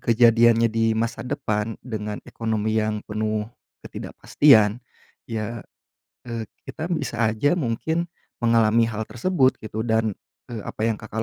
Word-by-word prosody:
kejadiannya 115 0 +5
di 115 0 +2
masa 115 0 -1
depan 110 -3 -2
dengan 105 -3 -4
ekonomi 110 -1 -2
yang 110 0 -1
penuh 110 0 -1 0.4
ketidakpastian, 110 -6 +3 0.5
ya, 115 0 -4 0.7
eee, 115 -2 -4 0.2
kita 160 - -5
bisa 120 -8 -1
aja 110 +9 +2
mungkin 160 +6 -1 0.4
mengalami 115 0 +4
hal 110 0 -3
tersebut 130 0 +1
gitu, 110 0 -4
dan, 110 -2 +1 0.4
eee, 115 -3 -5
apa 110 - -2
yang 115 -2 +1
Kakak 110 +1 -4
115 Hz, 130 wpm, -24 LUFS, 110-120 Hz, 0.7 s, kejadiannya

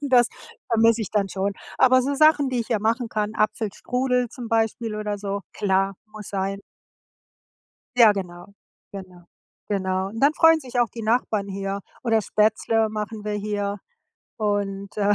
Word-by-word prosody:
Und 285 - -3
das 245 -1 +6 0.4
vermisse 230 0 +4
ich - - -6
dann 200 -2 +1
schon. 195 +2 -2 0.3
Aber 255 0 +6
so 280 +2 -1
Sachen, 300 -2 +4
die 250 -2 0
ich 230 - -5
hier 220 -4 0
machen 230 +2 0
kann, 215 0 -2
Apfelstrudel 245 +4 0
zum 240 -3 -8
Beispiel 225 0 0
oder 210 -1 -3
so, 200 0 -3
klar, 195 0 +1 0.2
muss 215 -2 -9
sein. 195 0 -3 1.4
Ja, 220 -3 +8
genau, 180 -1 -7 0.4
genau, 185 -3 -10 0.5
genau. 190 -1 -1
Und 225 +3 -7
dann 290 +3 +4
freuen 325 -1 +5
sich 250 -2 -5
auch 240 -2 +3
die 235 - -8
Nachbarn 215 -3 0
hier. 195 +1 -3 0.2
Oder 225 -2 +2
Spätzle 220 +1 +1
machen 215 0 -5
wir 210 - -2
hier. 205 -1 -2 0.6
Und, 200 -2 -2
äh, 205 0 +3
215 Hz, 160 wpm, -24 LUFS, 200-235 Hz, 1.4 s, Ja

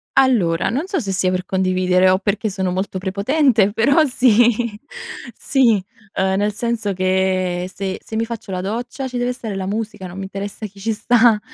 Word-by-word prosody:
Allora, 210 -13 +3
non 285 - -2
so 385 - -1
se 200 -6 -3
sia 185 0 +1
per 185 0 -2
condividere 185 0 +2
o 185 - +4
perché 205 +2 -1
sono 190 -2 -2
molto 190 +1 -2
prepotente 205 +3 +2
però 280 +9 +4
sì. 240 -3 +3 0.6
Sì, 235 -8 +2 0.3
ehm, 190 0 +1
nel 205 +1 0
senso 220 -2 -1
che 185 -1 0
se 190 -1 -4
se 220 - -7
mi 225 +1 0
faccio 230 -4 -7
la 185 -1 -2
doccia 240 +6 -4
ci 250 - -5
deve 245 0 0
essere 230 -5 -4
la 190 -1 -3
musica, 210 -2 -4
non 180 - -10
mi 195 - -4
interessa 200 +2 -6
chi 200 -1 -11
ci 225 +3 -1
sta. 230 0 +4
205 Hz, 185 wpm, -20 LUFS, 190-235 Hz, 0.6 s, o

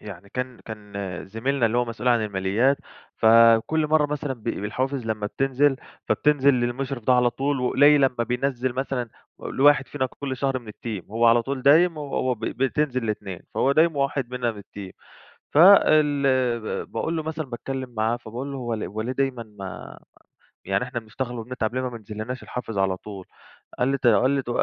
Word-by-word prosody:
يعني 100 -1 -10
كان 125 -1 -4
كان 105 -2 -10 0.3
زميلنا 115 +5 0
اللي 115 +2 0
هو 125 - +2
مسؤول 120 +2 -3
عن 115 -3 +3
الماليات، 105 +7 +1 0.4
فكل 115 +7 +5
مرّة 155 -1 +3
مثلًا 145 -1 -3
ب 120 -4 -12
بالحوافز 120 +4 -3
لمّا 110 -2 -2
بتنزل، 135 +4 +1 0.3
فبتنزل 140 -2 +3
للمُشرف 125 +1 -2
ده 130 - +4
على 125 -1 +4
طول 135 +3 -1
وقليل 145 +3 +5
أمّا 125 -3 0
بينزّل 125 0 -1
مثلًا 130 -2 -3 0.3
و - - -7
لواحد 145 0 +4
فينا 130 -3 -1
كل 135 0 -6
شهر 135 0 -1
من 115 -3 -15
الteam. 105 -4 -6
وهو 115 +3 +2
على 115 0 +5
طول 135 0 -4
دايم، 160 +4 +5
وهو 135 -3 -1
ب - - -21
بتنزل 130 -2 -1
ل2. 95 -4 -4
فهو 135 - +2
دايم 160 +1 +3
وواحد 140 -2 -1
مننا 125 -2 -1
من 105 - -10
الteam. 100 -1 -10 0.6
فال 155 -4 +6 0.6
ب - - -28
باقول 165 - -2
له 160 - -2
مثلًا 160 0 -4
باتكلّم 130 +2 -5
معاه 110 +1 0
فباقول 120 +4 -7
له 135 - -5
"هو 120 -2 -3
ل 110 - -5
هو 105 +4 -5
ليه 120 +4 -2
دايمًا 135 -3 -1
م 100 -3 -9 0.7
يعني 95 +4 0
إحنا 125 -1 -4
بنشتغل 120 +2 -5
وبنتعب 120 0 -4
ليه 130 - 0
ما 130 - -2
مبينزلّناش 110 +2 -7
الحافز 115 -4 -6
على 95 -1 +1
طول؟" 95 -1 -10 0.5
قال 125 - +2
لي 140 - +1
ت 125 - 0
قال 120 +4 +4
لي 140 -1 +1
ت 120 - -9
125 Hz, 190 wpm, -24 LUFS, 115-140 Hz, 0.7 s, فال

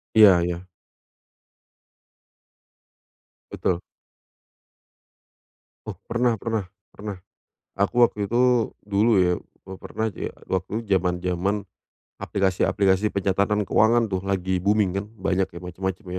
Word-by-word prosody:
Iya 100 -5 +8
iya. 90 +1 -3 2.8
Betul. 90 -2 -1 2.1
Oh, - - -5 0.2
pernah 120 +1 +2
pernah 110 -3 -2 0.2
pernah. 105 -1 -7 0.6
Aku 120 +5 +4
waktu 105 -3 -3
itu, 125 -1 +2
dulu 105 +2 +3
ya, 90 -1 +2 0.3
pe 95 - -10
pernah 110 0 -3
ja - - -4 0.2
waktu 95 +5 -2
jaman-jaman, 90 +1 0 0.5
aplikasi-aplikasi 95 +1 +1
pencatatan 100 +2 +1
keuangan 115 +1 +3
tuh, 95 - 0
lagi 95 -1 -1
booming 100 0 +2
kan, 100 - -6
banyak 95 -1 0
ya, 85 - -10
macam-macam 95 +3 -5
100 Hz, 100 wpm, -24 LUFS, 95-110 Hz, 2.8 s, Iya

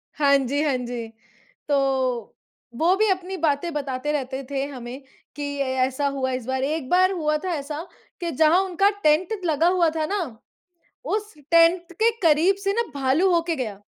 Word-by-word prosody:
हाँ 280 -1 +4
जी, 275 +2 -1
हाँ 285 -4 +1
जी। 240 -2 -5 0.6
तो 290 - +2 1.0
वो 345 +6 +3
भी 435 +2 +2
अपनी 375 0 -2
बातें 310 +1 0
बताते 280 -1 -3
रहते 270 -2 -3
थे 275 -1 -1
हमें 255 -1 -8 0.3
कि 290 - -5 0.2
ए 260 -1 -1
ऐसा 265 +2 -1
हुआ 260 -1 -1
इस 255 -2 -4
बार। 260 +1 -1
एक 295 -1 -2
बार 370 +1 +4
हुआ 305 -5 0
था 370 - -1
ऐसा 295 +2 -5 0.4
कि 340 -1 -2
जहाँ 315 +5 +4
उनका 385 +1 +2
टेंट 350 +8 +2
लगा 320 0 +2
हुआ 355 -2 +3
था 315 -1 0
ना, 400 +3 -1 0.8
उस 425 -1 -3 0.2
टेंट 335 +1 +4
के 460 - +6
करीब 330 +4 +4
से 395 - +2
ना 470 +3 +1
भालू 280 +7 +2
होके 335 -1 0
गया। 215 -7 -5
305 Hz, 175 wpm, -23 LUFS, 270-355 Hz, 1.0 s, के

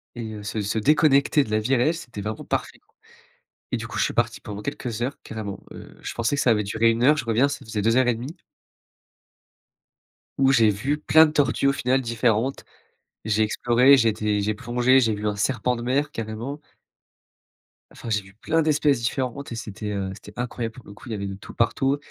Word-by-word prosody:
et 115 -2 -6
heu, 105 - -8
se 105 +1 -3
se 105 +2 -2
déconnecter 145 +1 +4
de 110 - -10
la 110 - +2
vie 125 +5 +1
réelle, 150 +7 +2
c'était 120 -10 -8
vraiment 105 +1 -5
parfait - - -3
quoi, - - -40 0.8
et - - +2
du - - -6
coup - - -5
je - - +3
suis - - -2
parti - - 0
pendant 105 0 -7
quelques 115 0 -4
heures 130 +4 -3
carrément, 100 -3 -6
heu, - - -12
je - - -5
pensais 115 +4 0
que - - +1
ça 125 - +3
avait 105 -2 +3
duré 110 +3 +2
1 115 +1 -1
heure, 150 +2 +6
je 135 - -3
reviens 115 +5 +3
ça 145 - -6
faisait 110 -2 -3
2 115 +3 +2
heures 130 -1 +4
et 120 - +3
1/2 130 +10 -7 2.0
où 135 0 +5
j'ai 115 -5 +5
vu 130 +9 -1
plein 160 +1 +5
de 150 - -4
tortues 140 -2 +1
au - - +5
final 130 +2 +1
différentes, 115 +1 0 0.6
j'ai 110 0 +1
exploré, 120 +5 +4
j'ai 115 -4 +3
été 105 -1 -1
j'ai 105 +1 0
plongé, 125 +3 +2
j'ai 115 -3 +2
vu 105 0 -5
un 105 - -1
serpent 125 +2 0
de 120 - -6
mer 140 +5 0
carrément 115 +6 -5 1.3
enfin 115 - -9
j'ai 105 -2 +1
vu 95 0 -17
plein 160 +10 0
d'espèces 150 -4 +2
différentes 130 +3 -3
et 115 - -4
c'était, 105 -1 -6
heu, 95 -1 -3
c'était 105 +1 -13
incroyable 120 -2 -4
pour 125 - -13
le 100 - -11
coup 120 +4 -13
il - - -5
y - - -2
avait 100 -1 -4
de 95 - -5
tout 95 - -12
partout, 135 +4 +1
115 Hz, 225 wpm, -24 LUFS, 110-135 Hz, 2.0 s, heure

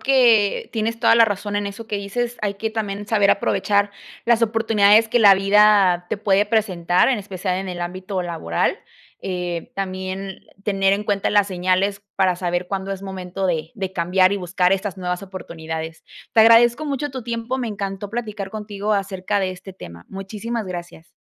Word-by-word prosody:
que 240 -6 +3
tienes 225 +1 -2
toda - - +5
la 230 0 +7
razón 205 0 -3
en 205 0 -1
eso 220 +3 -9
que 210 - -4
dices, 240 +5 -3
hay 200 -1 -1
que 220 +2 -3
también 205 -2 -4
saber 205 -3 +3
aprovechar 200 0 +1 0.3
las 235 -1 +3
oportunidades 220 -1 +4
que 240 +1 +1
la 200 -2 +8
vida 195 -3 +4
te - - 0
puede 200 0 +2
presentar, 185 -4 +2
en 250 -5 +1
especial 185 -1 -3
en 190 0 -5
el 175 -1 -5
ámbito 185 +2 -4
laboral, 165 - -1 0.4
eh, 180 -3 -4
también 190 0 -4 0.2
tener 195 -1 +2
en 205 +1 -1
cuenta 200 -2 0
las 205 -1 +4
señales, 185 +2 0
para 190 -2 +3
saber 175 0 -2
cuándo 195 0 -4
es 195 -1 -4
momento 190 -1 -4
de 160 -2 -2
de 190 -2 -4
cambiar 185 +2 +2
y - - 0
buscar 180 0 +1
estas 195 -1 -2
nuevas 180 +1 -3
oportunidades. 160 -4 -7 0.3
Te 225 - +5
agradezco 235 +5 +6
mucho 290 0 -2
tu 260 -2 -5
tiempo, 235 +2 -3
me 240 -3 -2
encantó 200 -1 -5
platicar 215 -4 -5
contigo 210 0 -3
acerca 195 0 -1
de 190 -2 -1
este 185 +1 -11
tema. 85 - -11
Muchísimas 210 +3 -5
gracias. 175 -2 -8
195 Hz, 180 wpm, -21 LUFS, 185-215 Hz, 0.4 s, la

